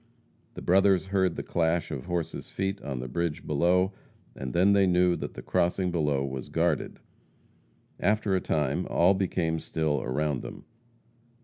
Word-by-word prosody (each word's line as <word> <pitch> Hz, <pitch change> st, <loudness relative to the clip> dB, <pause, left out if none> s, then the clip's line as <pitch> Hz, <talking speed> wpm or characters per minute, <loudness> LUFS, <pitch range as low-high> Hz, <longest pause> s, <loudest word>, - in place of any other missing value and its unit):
The -, -, -8 dB
brothers 95 Hz, 0 st, +4 dB
heard 95 Hz, -3 st, +1 dB
the -, -, -4 dB
clash 85 Hz, 0 st, 0 dB
of 70 Hz, -4 st, -5 dB
horses' 85 Hz, -2 st, -3 dB
feet 95 Hz, +1 st, -3 dB
on 65 Hz, -3 st, -4 dB
a -, -, -5 dB
bridge 85 Hz, +3 st, -2 dB
below, 90 Hz, +6 st, +2 dB, 0.4 s
and 65 Hz, -2 st, -5 dB
then 95 Hz, +8 st, +4 dB
they 100 Hz, -1 st, +4 dB
knew 90 Hz, 0 st, +3 dB
that -, -, -6 dB
the -, -, -8 dB
crossing 90 Hz, +1 st, 0 dB
below 75 Hz, -5 st, 0 dB
was 65 Hz, -1 st, -6 dB
guarded. 80 Hz, -3 st, 0 dB, 1.0 s
After 105 Hz, 0 st, +1 dB
a 95 Hz, -, +1 dB
time 75 Hz, -4 st, -1 dB
all 90 Hz, +3 st, +4 dB
became 90 Hz, -4 st, -1 dB
still 80 Hz, -2 st, -1 dB
around 70 Hz, +2 st, -1 dB
them. -, -, -9 dB
85 Hz, 155 wpm, -28 LUFS, 75-95 Hz, 1.0 s, brothers